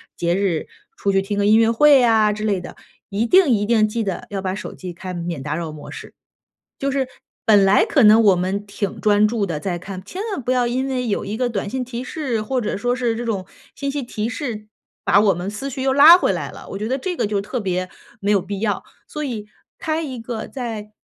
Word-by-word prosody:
节 170 0 0
日 190 -5 -1 0.3
出 200 - 0
去 195 0 +3
听 205 +1 -3
个 200 - +2
音 215 +1 +6
乐 225 0 +4
会 280 +2 +6
啊 220 -3 +4
之 215 +1 -5
类 200 -4 0
的， 175 - -9 0.3
一 210 +3 0
定 360 +3 +5
一 205 -4 +2
定 215 -1 +3
记 225 +2 -2
得 195 -4 -4
要 195 -1 -3
把 185 - -1
手 200 - -6
机 180 -2 -7
开 185 +2 -7
免 170 -4 -4
打 150 +2 -3
扰 165 -2 -4
模 150 -1 -10
式。 - - -10 0.7
就 275 - -1
是 270 -1 0 0.4
本 205 -3 +6
来 195 - +5
可 275 - +2
能 215 +2 +7
我 200 -3 +6
们 190 +3 -2
挺 200 -1 -4
专 210 0 +4
注 220 -2 -1
地 165 -6 -3
在 175 +2 -2
看， 185 +1 -8
千 365 - -6
万 370 - -3
不 245 - -2
要 250 -1 +2
因 255 +3 -1
为 250 -2 -2
有 205 - -1
1 205 +2 -3
个 250 +1 0
短 205 -2 -3
信 255 +3 -3
提 245 0 -5
示， 260 -4 -3
或 255 +5 -2
者 215 - -2
说 245 +4 0
是 240 -2 0
这 235 - -4
种 200 -5 -2 0.3
信 280 -1 -3
息 285 0 -3
提 230 -2 -3
示， 225 -4 -5 0.4
把 200 - +5
我 205 -2 +4
们 175 +3 -4
思 215 +7 -5
绪 265 0 -5
又 265 0 +2
拉 285 +5 +9
回 360 - +1
来 - - -4
了， - - -12
我 195 - -5
觉 215 +2 -3
得 260 - 0
这 355 +6 -3
个 - - +1
就 205 0 -1
特 245 +5 -4
别 185 -2 -2 0.3
没 200 +1 0
有 200 - +4
必 195 +2 -5
要， 205 -3 -1 0.2
所 300 - -6
以 230 -7 -4 0.3
开 315 0 -1
一 260 -6 -5
个 225 -1 -5
在 225 -5 -6
215 Hz, 265 characters per minute, -21 LUFS, 195-250 Hz, 0.7 s, 拉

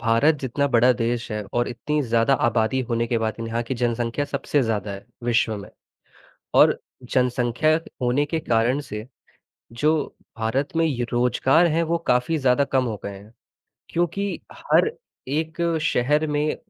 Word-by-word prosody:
भारत 115 +7 +3
जितना 140 +2 0
बड़ा 125 +2 +5
देश 120 0 -2
है 105 0 -2
और 120 0 +1
इतनी 150 +5 -2
ज़्यादा 115 +2 +2
आबादी 115 +3 +1
होने 115 0 +1
के 115 -1 0
बाद 110 -1 -1
यहाँ 115 +1 -2
की 120 +3 -4
जनसंख्या 120 +2 -1
सबसे 145 +1 -1
ज़्यादा 110 -3 -1
है 100 - -9 0.2
विश्व 115 -2 +1
में। 100 - -9 0.9
और - - +6 0.3
जनसंख्या 125 +3 +1 0.3
होने 125 +4 +2
के 160 +2 -2
कारण 120 0 +1
से 105 -6 -7 0.8
जो 155 +1 +4 0.4
भारत 115 +6 -1
में 165 0 +3
ये 130 -6 -1
रोज़गार 125 +7 +3
हैं 165 +1 +2
वो 170 - +2
काफ़ी 125 +6 +2
ज़्यादा 130 -1 +3
कम 135 -1 +1
हो 115 -3 -2
गए 100 -1 -6
हैं, 105 +3 -16 0.6
क्योंकि 180 +4 -1
हर 440 - +2 0.4
एक 160 +4 -2 0.2
शहर 150 +3 +2
में 150 +1 0
125 Hz, 160 wpm, -23 LUFS, 115-145 Hz, 0.9 s, और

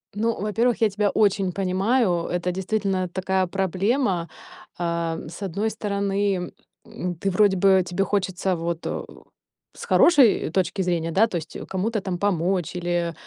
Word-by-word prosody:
Ну, 225 +2 -1
во-первых, 225 +4 0
я 220 - +4
тебя 205 +1 0
очень 195 -3 +2
понимаю, 190 0 +1
это 180 0 -1
действительно 190 -1 -1
такая 190 +1 0
проблема. 190 - 0 0.5
А, 170 -1 -1
с 170 +5 -10
одной 200 +4 -1
стороны, 200 -3 -1 0.3
м, 180 -1 -5
ты 195 +4 -2
вроде 195 0 +3
бы 190 0 +4
тебе 180 +2 -1
хочется 190 -2 -1
вот, 170 0 -4
о, - - -4 0.7
с - - -9
хорошей 275 - +5
точки 190 +2 0
зрения, 170 -2 -1
да, 215 +6 +4
то 190 - -6
есть 160 - -7
кому-то 205 +3 -1
там 185 -2 -3
помочь 180 -2 0
или, 175 -1 -1
190 Hz, 150 wpm, -24 LUFS, 175-205 Hz, 0.7 s, хорошей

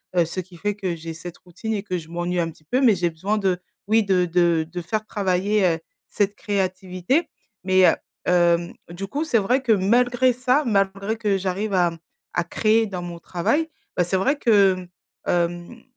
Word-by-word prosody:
heu, 175 - +5
ce 170 +3 -5
qui 180 0 -16
fait 205 +4 -1
que 190 -4 -2
j'ai 165 0 -7
cette 170 +1 -9
routine 185 +5 -6
et 205 -1 -2
que 185 -3 -2
je 160 -2 -8
m'ennuie 175 +1 -2
un 165 -1 0
petit 155 - -16
peu, 250 - 0
mais 230 -6 +5
j'ai 175 -1 0
besoin 195 +7 -2
de 190 -3 0 0.3
oui, 220 +1 +4
de 185 -2 +2
de 170 -2 +2
de 175 +1 -5
faire 215 +5 -3
travailler, 200 0 +1
heu, 165 -2 +2 0.3
cette 205 0 0
créativité. 190 - -1 0.3
Mais, 185 0 +5
heu, - - +4 0.3
hem, 175 -1 +3 0.2
du 180 +3 -6
coup 290 +9 -2
c'est 240 -7 +2
vrai 245 +6 +2
que 235 -4 +3
malgré 245 +6 +3
ça, 255 +4 +1
malgré 195 0 0
que 205 -3 +1
j'arrive 195 +2 -2
à, 175 -2 +3
mmh, 165 - -11 0.3
à 175 - +1
créer 220 +4 +2
dans 185 -3 -5
mon 175 -1 -7
travail, 285 - 0 0.3
bah, 180 - +3
c'est 190 - -1
vrai 275 +10 +1
que, 200 -7 +4 0.5
mmh, - - -13
hem, 175 +6 -1
190 Hz, 205 wpm, -23 LUFS, 175-215 Hz, 0.5 s, heu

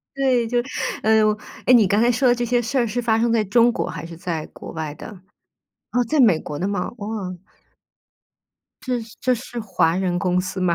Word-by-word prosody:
对， 260 -4 +2
就 245 +2 -1 0.5
哎 220 0 +4
哟， 215 -1 +3 0.3
诶， 250 - +5
你 225 -5 +6
刚 205 +3 +2
才 240 +1 +4
说 255 +2 +2
的 240 - +4
这 240 0 -2
些 245 +1 +1
事 240 +4 -2
儿 240 -2 +2
是 235 +3 -2
发 225 -2 +2
生 235 0 +2
在 225 -2 +2
中 235 +4 +4
国， 180 - -3
还 165 -2 -6
是 170 - -9
在 165 -3 -4
国 - - -10
外 160 -2 -4
的？ - - -9 0.8
啊， 245 - +1
在 310 - +1
美 215 -11 +5
国 150 - -6
的 185 - -1
吗？ 200 -3 -2
哇。 205 -2 -6 1.8
这 250 -2 -1
是 220 -1 -13
这 255 0 +2
是 240 0 -6
华 185 -6 +1
人 180 -2 0
公 180 -1 +1
司 185 +1 -5
吗？ 180 -2 +2
220 Hz, 235 characters per minute, -22 LUFS, 180-240 Hz, 1.8 s, 你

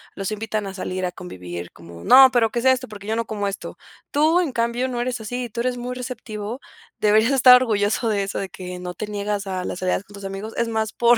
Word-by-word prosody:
los 195 +1 -3
invitan 215 0 -3
a 195 - -6
salir 185 -1 -3
a 180 - -2
convivir 90 - -8
como: 85 0 -12
"No, 265 0 +9
pero 235 -3 +3
que 235 - -1
sea 260 +2 +5
esto, 255 0 -4
porque 205 -1 -10
yo 220 - 0
no 230 0 -1
como 210 -2 -3
esto". 200 0 -6 0.3
Tú, 315 +4 +4
en 330 -6 -1
cambio, 235 +2 0
no 245 -1 -3
eres 245 -1 -2
así, 245 +3 -4
tú 235 +2 -3
eres 250 0 -1
muy 250 +1 -4
receptivo, 240 -2 -6 0.4
deberías 215 +4 +4
estar 255 -1 +9
orgulloso 225 -2 +1
de 205 -2 +1
eso, 195 - -3
de 195 - -4
que 180 -1 -7
no 180 0 -5
te 210 - -5
niegas 205 0 -2
a 185 -1 -3
las - - -4
salidas 185 +1 0
con 205 - -17
tus 200 0 -9
amigos, 195 +3 -6
es 235 - +1
más, 220 -1 -1
por 240 0 +4
215 Hz, 245 wpm, -22 LUFS, 195-245 Hz, 0.4 s, No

